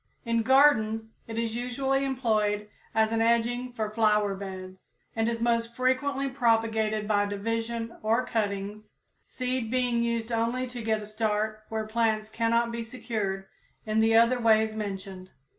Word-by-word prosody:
In 230 0 +1
gardens 225 -4 +4
it 225 0 -6
is 230 -1 -1
usually 265 +3 0
employed 215 -6 0 0.3
as 220 0 +3
an 225 0 +1
edging 235 +2 +1
for 220 -3 -3
flower 210 -2 +2
beds, 190 -1 -8 0.3
and 225 0 +1
is 230 -1 -2
most 230 0 0
frequently 270 +2 +1
propagated 225 -4 +1
by 205 -1 +2
division 230 +3 -3
or 225 +3 +1
cuttings, 210 -1 -3 0.3
seed 255 -2 -3
being 245 -1 +1
used 235 0 -1
only 230 +3 0
to 245 -1 -7
get 220 -1 0
a - - -7
start 215 0 -2
where 220 -1 -2
plants 220 -1 0
cannot 230 +1 +1
be 235 0 -3
secured 220 -5 -3 0.4
in 215 0 +1
the 225 0 +4
other 235 +2 +5
ways 220 -1 +3
mentioned. 195 -3 -6
225 Hz, 150 wpm, -28 LUFS, 215-235 Hz, 0.4 s, other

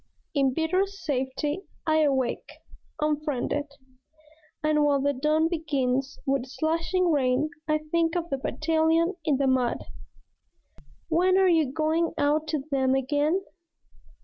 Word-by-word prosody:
In 270 -3 +2
bitter 365 +5 +1
safety 295 -3 -3 0.2
I 315 -1 +3
awake, 270 -5 0 0.5
unfriended; 295 -2 -1 1.0
And 305 -1 +3
while 285 -1 +3
the 285 +1 +1
dawn 305 +4 +2
begins 275 -5 -1
with 270 -2 0
slashing 330 +5 0
rain 275 +1 +1 0.2
I 305 0 +1
think 335 0 +1
of 340 -2 -2
the 275 - -1
Battalion 325 +4 +1
in 300 -3 +2
the 275 - +1
mud. 255 -2 +1 1.2
"When 365 +3 +3
are 385 -1 +5
you 320 -6 +3
going 320 +3 0
out 300 +2 +1
to 305 -3 -2
them 265 -1 +2
again? 290 +7 +1
300 Hz, 125 wpm, -26 LUFS, 275-325 Hz, 1.2 s, are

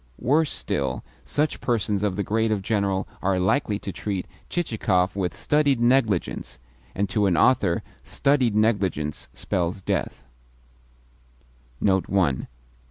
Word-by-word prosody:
Worse 150 +4 +2
still, 65 -3 -2 0.2
such 150 +1 -1
persons 105 -4 0
of 105 -3 0
the 100 - -1
grade 110 +3 +1
of 100 -3 0
General 100 -2 0
are 95 0 +1
likely 100 +3 +1
to 100 - -6
treat 95 -1 -3 0.2
Chichikov 105 - 0
with 95 -3 -1
studied 145 -4 +1
negligence 120 -6 +1 0.4
and 100 +2 0
to 100 +2 +1
an 90 -3 +2
author 95 -4 +3 0.2
studied 135 -6 +1
negligence 100 -9 0
spells 90 +2 -2
death. - - -2
100 Hz, 115 wpm, -24 LUFS, 95-120 Hz, 0.4 s, author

